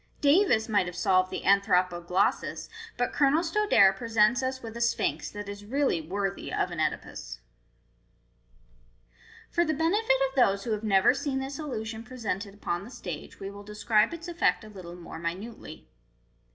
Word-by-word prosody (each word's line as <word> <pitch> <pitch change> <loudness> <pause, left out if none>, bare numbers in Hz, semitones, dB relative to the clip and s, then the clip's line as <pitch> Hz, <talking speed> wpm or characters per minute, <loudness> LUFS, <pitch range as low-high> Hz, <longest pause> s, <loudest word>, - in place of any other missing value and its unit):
" - - -36
Davus 290 - +4
might 205 -5 +2
have 175 - -6
solved 185 +1 +2
the - - -5
' - - -11
Anthropoglossus,* 180 -4 +1 0.3
but 245 - -1
Colonel 290 +3 +3
Stodare 325 - +4
presents 225 +3 +2
us 260 0 -3
with 225 0 -7
a 235 - -5
Sphinx 165 -9 0
that 205 0 -7
is 200 0 -7
really 260 - 0
worthy 195 +4 -3
of 180 - -1
an 170 - -5
CEdipus." 155 - -3 2.1
For 345 - +3
the 315 -2 0
benefit 330 +2 +2
of 265 - -13
those 200 -7 +3
who 235 - -3
have 215 0 -2
never 195 +1 +4
seen 270 0 -2
this 270 +2 -4
illusion 225 -7 -4
pre 250 +2 -11
sented 205 -3 -3
upon 175 -3 -3
the 215 - -10
stage, 175 -10 -8
we 195 0 -6
will 200 0 -10
describe 210 +1 +1
its 335 +1 -7
effect 345 -8 +1
a 215 - -11
little 180 -4 -10
more 170 -2 -9
minutely. 175 +1 -6
210 Hz, 175 wpm, -28 LUFS, 185-265 Hz, 2.1 s, Davus